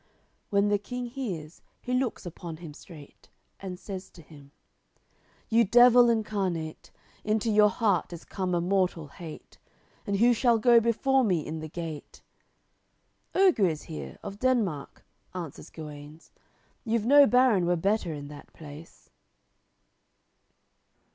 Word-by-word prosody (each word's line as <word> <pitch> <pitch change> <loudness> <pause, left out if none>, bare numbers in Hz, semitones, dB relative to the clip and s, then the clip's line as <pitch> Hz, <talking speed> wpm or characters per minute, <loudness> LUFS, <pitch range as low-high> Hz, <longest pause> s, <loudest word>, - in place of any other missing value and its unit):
When 200 0 +2
the 205 0 +2
King 245 +4 -6
hears, 200 - -6 0.2
he 250 - -5
looks 250 -5 -1
upon 170 -1 -8
him 160 -3 -10
straight, 150 -2 -15 0.3
And 185 -2 -7
says 190 -2 -8
to 165 - -16
him: 145 -2 -16 1.0
"You 230 +1 +4
devil 240 +2 +6
incarnate; 195 -8 -2 0.3
Into 215 +1 0
your 210 0 +5
heart 205 -1 0
is 170 -1 -9
come 185 -2 -3
a 170 - 0
mortal 180 -4 0
hate. 160 +1 -11 0.5
And 200 - 0
who 235 +4 +4
shall 235 0 +3
go 235 +1 +5
before 260 +4 +2
me 180 -9 0
in 160 +1 -5
the 155 0 -7
gate?" 160 -2 -8 1.1
"Oger 365 - +4
is 155 -3 -3
here, 70 -4 -8
of 200 +1 -8
Denmark;" 220 - -1 0.3
answers 170 -6 -7
Guenes, 150 0 -11 0.5
"You've 225 -2 -1
no 285 +2 +7
baron 245 -9 +3
were 175 - +2
better 195 +1 0
in 145 -2 -7
that 145 -1 -12
place." 155 +1 -13
195 Hz, 135 wpm, -27 LUFS, 160-230 Hz, 1.1 s, no